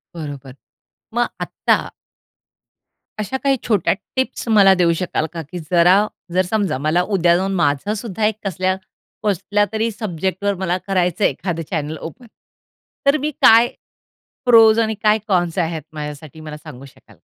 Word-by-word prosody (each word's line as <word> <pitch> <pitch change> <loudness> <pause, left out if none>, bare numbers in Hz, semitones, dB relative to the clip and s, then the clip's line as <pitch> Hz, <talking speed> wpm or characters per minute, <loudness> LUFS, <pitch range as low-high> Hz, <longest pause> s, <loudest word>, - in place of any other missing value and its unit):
बरोबर. 140 -5 -8 0.6
मग 240 +1 +1
आत्ता - - +1 1.4
अश्या 265 +6 -3
काही 275 -1 +2
छोट्या 210 -6 +2 0.2
टिप्स 260 -2 -2
मला 200 -3 +6
देऊ 175 -2 +3
शकाल 180 -3 -1
का, 165 - -4
की 165 +4 -8
जरा 180 +4 +5 0.3
जर 185 - +3
समजा 195 -6 -1
मला 155 +5 +1
उद्या 170 -2 +4
जाऊन 195 +1 -1
माझं 170 +3 +1
सुद्धा 220 -1 -3
एक 215 -1 +1
कसल्या 185 0 0 0.5
कसल्यातरी, 205 +2 0
सब्जेक्टवर 195 -1 -2
मला 180 -1 0
करायचंय 180 0 +1
एखादं 170 -3 -4
चॅनल 155 -2 -3
ओपन. 200 - -9 0.8
तर 280 +2 +4
मी 305 +1 -2
काय, 230 +2 +7 0.8
प्रोज 225 -2 +7
आणि 220 -1 +1
काय 215 0 +4
कॉन्स 175 -3 0
आहेत. 165 -2 -1
माझ्यासाठी, 150 0 -8
मला 155 -1 -8
सांगू 140 -4 -11
शकाल 135 - -19
का? - - -33
185 Hz, 145 wpm, -19 LUFS, 160-215 Hz, 1.4 s, काय